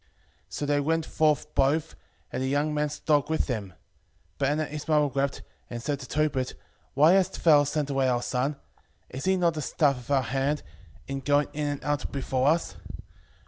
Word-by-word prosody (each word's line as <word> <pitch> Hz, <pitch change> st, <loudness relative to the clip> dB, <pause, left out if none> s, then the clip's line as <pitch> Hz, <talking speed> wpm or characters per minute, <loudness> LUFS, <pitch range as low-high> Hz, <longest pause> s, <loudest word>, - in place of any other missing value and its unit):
So 100 Hz, +10 st, -4 dB
they 145 Hz, 0 st, +2 dB
went 160 Hz, +2 st, 0 dB
forth 150 Hz, -1 st, +1 dB
both, 150 Hz, +4 st, +1 dB, 0.4 s
and -, -, -2 dB
the 130 Hz, -, 0 dB
young 145 Hz, +3 st, +1 dB
man's 150 Hz, 0 st, -1 dB
dog 145 Hz, -1 st, +1 dB
with 160 Hz, -, +1 dB
them. 110 Hz, -7 st, -3 dB
5:17 95 Hz, -, -17 dB, 0.7 s
But 140 Hz, -1 st, +2 dB
Anna 155 Hz, +2 st, 0 dB
his 150 Hz, 0 st, -7 dB
mother 150 Hz, -2 st, +4 dB
wept, 140 Hz, 0 st, -2 dB, 0.3 s
and 120 Hz, -, -5 dB
said 140 Hz, +4 st, -2 dB
to 130 Hz, -, -9 dB
Tobit, 145 Hz, -4 st, 0 dB, 0.4 s
Why 155 Hz, +5 st, +6 dB
hast 190 Hz, -1 st, +1 dB
thou 150 Hz, -3 st, +7 dB
sent 145 Hz, 0 st, -1 dB
away 135 Hz, -1 st, +2 dB
our 120 Hz, -1 st, 0 dB
son? 135 Hz, +4 st, -1 dB, 0.6 s
is 130 Hz, -, -5 dB
he 190 Hz, 0 st, +3 dB
not 170 Hz, -2 st, +2 dB
the 155 Hz, -, -4 dB
staff 140 Hz, -1 st, +1 dB
of 125 Hz, -, -14 dB
our 135 Hz, -2 st, +3 dB
hand, 135 Hz, +4 st, -1 dB, 0.4 s
in 135 Hz, 0 st, -3 dB
going 145 Hz, +2 st, +2 dB
in 150 Hz, 0 st, -2 dB
and 145 Hz, -1 st, -3 dB
out 145 Hz, +1 st, -1 dB
before 135 Hz, -1 st, 0 dB
us? 165 Hz, +3 st, +1 dB
145 Hz, 195 wpm, -27 LUFS, 135-150 Hz, 0.7 s, thou